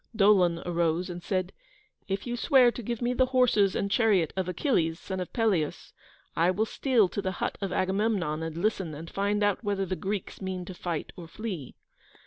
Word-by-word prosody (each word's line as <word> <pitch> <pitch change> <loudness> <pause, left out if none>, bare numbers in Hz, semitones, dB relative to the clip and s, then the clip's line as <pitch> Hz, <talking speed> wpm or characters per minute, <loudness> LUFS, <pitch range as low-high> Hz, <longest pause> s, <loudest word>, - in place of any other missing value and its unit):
Dolon 190 -5 +4
arose 170 +1 0
and 175 0 -7
said, 185 0 -2 0.5
"If 195 0 -2
you 240 - -3
will - - -3
swear 260 -4 +5
to 240 - -7
give 235 +1 -4
me 245 +1 +1
the 255 +1 +3
horses 245 -7 +3
and 200 - -1
chariot 200 -8 +3
of 190 -1 -1
Achilles, 170 - 0
son 190 -1 -5
of 180 - -5
Peleus, 205 - 0 0.4
I 170 +2 +3
will 200 +4 +1
steal 235 -3 +2
to 205 - -3
the 190 -1 -2
hut - - -2
of 195 -2 -2
Agamemnon 190 -4 0
and 160 0 -4
listen 190 -4 -1
and 165 +3 -9
find 205 +1 0
out 205 +2 +1
whether 200 -2 0
the 185 - -2
Greeks 195 +1 -4
mean 185 -1 -4
to 185 - -7
fight 175 -3 -4
or 170 -2 -9
flee." 180 - -6
190 Hz, 200 wpm, -28 LUFS, 175-215 Hz, 0.5 s, swear